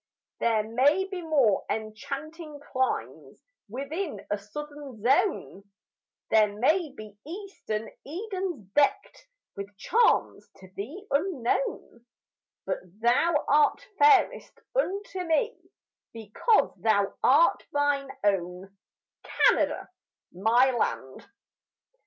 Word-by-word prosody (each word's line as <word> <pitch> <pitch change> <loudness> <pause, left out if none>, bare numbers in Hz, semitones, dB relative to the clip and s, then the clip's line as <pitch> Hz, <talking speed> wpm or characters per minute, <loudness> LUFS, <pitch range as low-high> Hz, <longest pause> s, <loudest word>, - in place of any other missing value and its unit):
There 225 -2 +2
may 265 - +2
be 380 -2 -6
more 280 - +2
enchanting 280 +9 -6
climes 260 -2 -3 0.3
Within 290 - -5
a 205 - +1
southern 290 +3 -9
zone; 275 - +1 0.7
There 215 -2 +5
may 310 - +2
be 215 -5 -12
eastern 320 - -6 0.2
Edens 370 - -5
deckt 295 - +1 0.3
With 200 0 -8
charms 455 - +1
to 185 - -15
thee 300 - -7
unknown; 275 -6 -1 0.6
But - - -2 0.2
thou 290 +7 +2
art 295 +1 +3
fairest 440 +3 +4 0.2
unto 400 -5 -1
me, 400 +8 +1 0.6
Because 225 - +1
thou 200 +1 +1
art - - +4
mine 290 -1 0
own, 190 -1 -1 0.5
Canada, - - +2 0.4
my 230 +8 +3
land. 135 - -3
275 Hz, 95 wpm, -27 LUFS, 215-345 Hz, 0.7 s, There